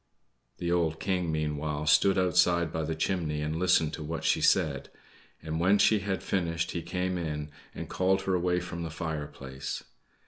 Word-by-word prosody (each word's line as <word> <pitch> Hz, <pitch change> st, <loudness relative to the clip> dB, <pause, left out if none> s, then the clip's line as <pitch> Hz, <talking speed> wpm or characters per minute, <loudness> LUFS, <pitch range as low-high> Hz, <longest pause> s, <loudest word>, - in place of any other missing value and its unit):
The 85 Hz, 0 st, -2 dB
old 80 Hz, -2 st, +1 dB
King, 90 Hz, -4 st, -1 dB
meanwhile, 75 Hz, -1 st, -2 dB
stood 95 Hz, +5 st, +4 dB
outside 90 Hz, -2 st, +3 dB
by 80 Hz, -, -1 dB
the 80 Hz, +1 st, -2 dB
chimney 80 Hz, -3 st, -1 dB
and 75 Hz, +1 st, -2 dB
listened 85 Hz, -4 st, +3 dB
to 80 Hz, -, -5 dB
what 80 Hz, +2 st, -4 dB
she -, -, +2 dB
said; -, -, +2 dB, 0.5 s
and 80 Hz, 0 st, -3 dB
when 95 Hz, +4 st, +4 dB
she 110 Hz, +1 st, +4 dB
had 95 Hz, -1 st, -3 dB
finished 85 Hz, -3 st, -1 dB
he 85 Hz, -, -3 dB
came 90 Hz, +2 st, -2 dB
in, 75 Hz, -2 st, -4 dB, 0.2 s
and -, -, -6 dB
called 95 Hz, +1 st, +1 dB
her 95 Hz, -, 0 dB
away 90 Hz, 0 st, +1 dB
from 85 Hz, -1 st, -6 dB
the 85 Hz, -, -3 dB
fireplace. 75 Hz, -5 st, -5 dB
85 Hz, 175 wpm, -29 LUFS, 75-90 Hz, 0.5 s, stood